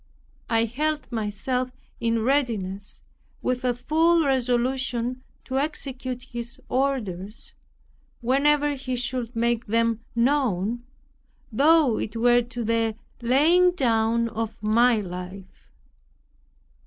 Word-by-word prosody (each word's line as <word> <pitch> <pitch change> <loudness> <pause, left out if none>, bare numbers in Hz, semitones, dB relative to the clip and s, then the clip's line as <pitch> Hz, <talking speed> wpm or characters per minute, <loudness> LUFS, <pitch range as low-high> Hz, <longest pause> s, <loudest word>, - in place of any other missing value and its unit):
I 225 0 +3
held 300 +6 -2
myself 235 +4 -2 0.3
in 230 -1 0
readiness 220 -8 -1 0.4
with 255 0 -1
a 250 -1 +1
full 320 +6 +3
resolution 255 -1 0 0.2
to 265 0 -1
execute 265 -4 -4
His 240 -2 -6
orders, 220 -7 -2 0.7
whenever 290 +4 +2
he 260 -2 -4
should 245 -1 -2
make 235 0 0
them 230 +1 +1 0.2
known, 235 -4 +1 0.7
though 285 0 +4
it 215 - -4
were 240 +1 +4
to 240 0 -5
the 225 0 +1 0.3
laying 325 +9 +4
down 230 -6 +2
of 225 0 -4
my 230 +2 +4
life. 185 +1 -9
240 Hz, 105 wpm, -25 LUFS, 225-265 Hz, 0.7 s, though